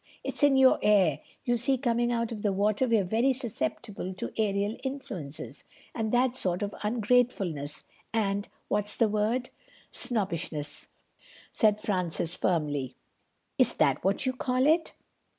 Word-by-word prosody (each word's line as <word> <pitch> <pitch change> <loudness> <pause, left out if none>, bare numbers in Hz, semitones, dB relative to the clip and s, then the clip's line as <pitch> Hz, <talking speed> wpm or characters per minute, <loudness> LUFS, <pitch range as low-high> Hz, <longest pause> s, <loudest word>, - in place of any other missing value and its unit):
It's - - -2
in 285 -2 +5
your 265 -1 +6
air. 195 -8 +4 0.3
You 240 - +2
see, 260 +3 +2
coming 240 -2 +1
out 235 -1 -1
of 215 -2 -5
the 205 - +1
water 210 +5 +1
we're 225 -4 +3
very 230 +8 +2
susceptible 210 - -4
to - - -5
aerial 205 0 0
influences—and 225 - -6
that 245 +1 +2
sort 180 -5 -1
of 205 - -3
ungratefulness 210 - 0 0.3
and, 205 -2 0 0.2
what's 210 0 0
the 230 - +3
word—?" 215 +4 0 0.4
"Snobbishness," 170 - -2 0.6
said 210 -2 +3
Francis 180 -4 -1
firmly. 145 -8 -1 0.6
"Is - - +4
that - - +2
what 195 +7 +1
you 260 - +1
call 255 0 0
it? 320 +2 +3
215 Hz, 135 wpm, -28 LUFS, 190-245 Hz, 0.6 s, your